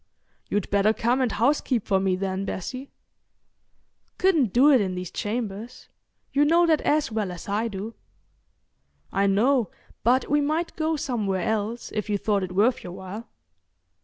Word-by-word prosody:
"You'd 205 -2 -1
better 200 +2 +3
come 245 +4 +1
and 250 -3 +1
housekeep 245 -1 +1
for 195 -1 +2
me 190 -1 +1
then, 190 0 -2
Bessie." 255 +8 -5 1.3
"Couldn't 325 - +3
do 270 +7 +6
it 260 -5 +5
in 185 -2 -2
these 180 -1 -5
chambers—you 230 +5 -4
know 335 +4 +4
that 315 -3 +3
as 300 -4 +1
well 215 -4 -2
as 175 - -9
I 210 +3 0
do." 210 +1 -6 1.2
"I 200 - +2
know, 225 +2 +2 0.3
but 250 +3 +3
we 295 +1 +2
might 310 +4 -1
go 320 0 0
somewhere 210 - -1
else, 220 +2 -2
if 215 0 -3
you 205 - +1
thought 200 0 0
it 180 -1 -5
worth 230 +6 +2
your 175 - -7
while." 190 +4 -8
220 Hz, 160 wpm, -25 LUFS, 195-265 Hz, 1.3 s, do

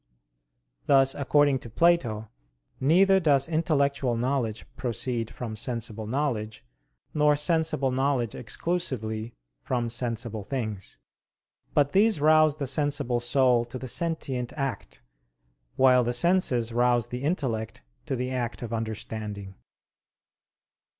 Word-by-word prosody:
Thus 135 -1 +5
according 145 0 +2
to 120 - -10
Plato, 115 -7 +2 0.5
neither 190 +7 +4
does 140 -6 +2
intellectual 140 -6 +1
knowledge 120 -3 -1
proceed 120 -2 -3
from 115 -2 -6
sensible 115 -1 -4
knowledge, 110 - -2 0.5
nor 150 -1 +4
sensible 155 -2 +1
knowledge 130 -3 0
exclusively 120 -7 -3 0.3
from 120 - -2
sensible 115 -3 -3
things; 110 -4 -5 0.8
but 145 -1 +3
these 210 -1 +3
rouse 155 0 +5
the 145 -2 -3
sensible 135 -3 0
soul 125 0 +3
to 120 +2 -7
the 130 - -7
sentient 135 -5 -2
act, 135 - -5 0.7
while 130 -1 +5
the 120 +1 -1
senses 125 -6 +2
rouse 120 -1 +2
the 125 +1 -5
intellect 120 - -2 0.2
to 135 - -1
the 125 +1 -3
act 120 -2 -3
of 115 -1 -5
understanding. 110 -3 -5
125 Hz, 115 wpm, -27 LUFS, 115-145 Hz, 0.8 s, Thus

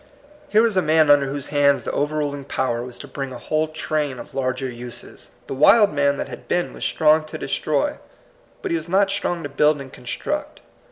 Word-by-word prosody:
Here 215 +2 +5
was 225 -3 +2
a 185 - +4
man 155 -2 +4
under 140 -1 +5
whose 140 0 -5
hands 140 -1 +3
the - - -3
overruling 145 -1 -1
Power 130 -4 -1
was 125 0 -8
to 145 - -9
bring 135 0 -5
a 125 - -7
whole 155 +6 -1
train 155 -3 -2
of - - -10
larger 130 0 -1
use& 120 -1 -8 0.2
The - - -5
wild 200 - +5
man 140 -1 +2
that - - -3
had - - -10
been 175 - 0
was - - -8
strong 155 0 +3
to 155 - -7
destroy, - - -1 0.6
but 390 - -2
he 335 - +2
was 250 - -7
not 195 +2 +3
strong 175 -4 -2
to - - -3
build 150 +1 +3
and 135 -1 -9
con 125 - -14
struct. - - -4
145 Hz, 215 wpm, -22 LUFS, 135-160 Hz, 0.6 s, Here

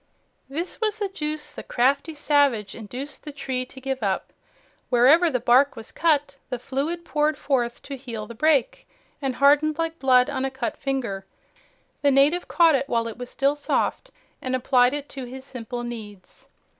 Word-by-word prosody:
This 335 +10 -5
was 435 -1 0
the 410 -2 -2
juice 305 -5 -3
the - - -8
crafty 280 +6 +1
savage 280 -9 +2
induced 250 +6 -7
the 300 - -7
tree 260 -3 -3
to 265 - -12
give 265 -1 -3
up. 195 -3 -2 0.6
Wherever 275 +8 +5
the 255 -5 0
bark 255 +4 +4
was 225 -1 -9
cut, 295 -4 +1
the 250 - -2
fluid 290 +8 -3
poured 300 -2 +1
forth 245 -5 -1
to 280 - -6
heal 235 -5 -6
the 235 - -9
break 280 +1 +1 0.3
and 265 -2 -1
hardened 290 +3 +4
like 330 0 -2
blood 255 -2 +5
on 270 -2 -2
a 270 - 0
cut 265 0 -3
finger. 235 -9 -3 0.7
The 285 - +4
native 280 +6 +3
caught 335 -2 +5
it 275 0 0
while 230 -1 +1
it 230 - -8
was 245 0 -6
still 275 +1 +1
soft 295 +11 -1 0.3
and 255 0 -1
applied 255 +1 +3
it 290 0 -5
to 265 -2 -7
his 260 +2 -9
simple 245 -2 -6
needs. 210 -5 -9
270 Hz, 180 wpm, -24 LUFS, 245-295 Hz, 0.7 s, Wherever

